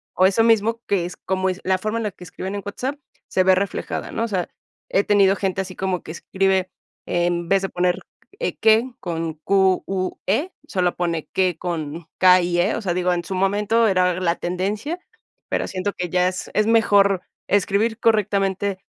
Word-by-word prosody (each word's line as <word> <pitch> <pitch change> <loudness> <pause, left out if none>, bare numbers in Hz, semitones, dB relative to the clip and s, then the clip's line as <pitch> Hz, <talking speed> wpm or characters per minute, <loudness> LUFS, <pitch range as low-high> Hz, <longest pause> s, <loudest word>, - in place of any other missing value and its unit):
o 185 - +4
eso 200 +4 +4
mismo 225 0 +2
que 185 -4 +1
es 175 - -6
como 190 0 -1
es 185 +1 -4
la 190 0 +2
forma 215 +4 -2
en - - -3
la 210 - -2
que 180 - -14
escriben 190 +3 -6
en 200 - -5
WhatsApp 255 +7 -3 0.3
se 185 - +2
ve 190 - +5
reflejada, 195 +1 -2
¿no? 230 - -2
O - - 0
sea 185 -5 -2 0.4
he 195 - +2
tenido 200 -2 +4
gente 190 -1 -1
así 185 -1 -7
como 185 -2 -2
que 160 - -9
escribe 190 +1 0 0.3
en 175 -1 0
vez 195 0 +4
de 195 - -2
poner 180 0 0 0.4
e - - -2
qué 225 +3 +4
con 165 -2 -3
cu 190 +3 +2
u 185 -1 -2
e 280 - 0 0.2
solo 180 -6 0
pone 170 -3 -2
que 185 -3 +1
con 165 -2 -4
ca 185 0 +6
y 175 0 0
e, 195 +5 +2
o - - -3
sea, 180 -4 -1
digo, 180 0 +1
en 175 -1 -2
su 190 - -5
momento 210 +4 +2
era 180 -2 +2
la 170 -1 +1
tendencia, 205 - -2 0.5
pero - - -1
siento 195 +2 -3
que 180 -1 -4
ya 180 +1 +2
es 185 0 -4
es 215 - +3
mejor 200 -4 +4 0.3
escribir 205 +3 +1
correctamente 200 -3 +1
190 Hz, 200 wpm, -22 LUFS, 180-205 Hz, 0.5 s, ca